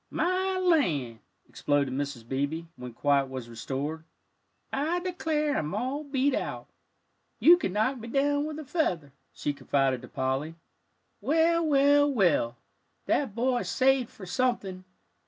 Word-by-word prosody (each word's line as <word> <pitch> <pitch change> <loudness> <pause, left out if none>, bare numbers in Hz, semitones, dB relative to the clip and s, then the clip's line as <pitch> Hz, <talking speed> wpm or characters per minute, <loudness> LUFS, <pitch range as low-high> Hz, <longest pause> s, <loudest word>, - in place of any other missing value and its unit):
"My 370 +1 0
land!" 175 - +1 0.3
exploded 145 -2 0
Mrs. 135 -4 -4
Beebe, 140 +5 -2
when 125 0 -8
quiet 140 +2 +1
was 130 -3 -6
restored. 135 +7 -4 0.7
"I 315 +6 0
declare, 315 -5 -1
I'm 155 +5 -2
all 260 +7 -2
beat 280 -1 +1
out. - - -3 0.7
You 345 - +8
could 270 - -2
knock 225 +5 +1
me 230 - -8
down 285 +3 +1
with 305 -1 -5
a 310 - -7
feather," 180 - -1 0.2
she 145 - -3
confided 135 -3 0
to 125 - -10
Polly. 135 +6 -2 0.7
"Well, 325 +7 +3
well, 285 0 +4
well, 165 - +2 0.5
that 265 -8 0
boy's 245 +1 0
saved 265 -2 +2
for 195 - -11
something. 190 -3 -1
225 Hz, 135 wpm, -28 LUFS, -, 0.7 s, You